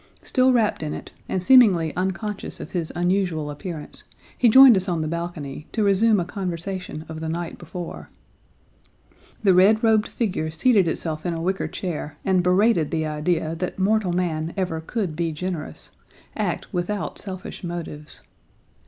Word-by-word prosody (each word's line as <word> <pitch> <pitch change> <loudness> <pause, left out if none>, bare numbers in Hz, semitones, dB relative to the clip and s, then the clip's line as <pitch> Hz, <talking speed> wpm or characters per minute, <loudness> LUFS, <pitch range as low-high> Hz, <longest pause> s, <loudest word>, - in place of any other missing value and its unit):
Still 260 0 +3
wrapped 225 -8 +2
in 150 -1 -3
it, - - -9 0.2
and 185 - -1
seemingly 190 -10 +5
unconscious 190 +3 -3
of - - -8
his 170 -3 -2
unusual 175 -4 0
appearance, 150 +1 -7 0.3
he 240 - +4
joined 260 0 +9
us 190 -1 -1
on 170 -2 0
the 155 - -2
balcony, 160 -3 -5
to 220 - +1
resume 205 +2 +4
a 175 - -1
conversation 180 -3 -5
of 160 -1 -7
the 160 0 -4
night 170 +1 -4
before. 175 0 -7 1.3
The 195 -3 +5
red 205 +5 +5
robed 220 -1 +4
figure 180 -9 -2
seated 190 +4 +3
itself 160 -1 -3
in 175 -2 -2
a 165 - -4
wicker 190 +2 -1
chair 165 -5 -5
and 190 -2 +3
berated 180 -2 +3
the 160 -2 -1
idea 155 +1 -1
that 180 +2 -4
mortal 200 0 +2
man 170 -2 -2
ever 175 -4 -1
could 185 -2 -3
be 165 0 -1
generous, 165 0 -5 0.4
act - - -3
without 185 +3 -2
selfish 190 -2 -7
motives. 170 -4 -7
180 Hz, 160 wpm, -23 LUFS, 160-195 Hz, 1.3 s, joined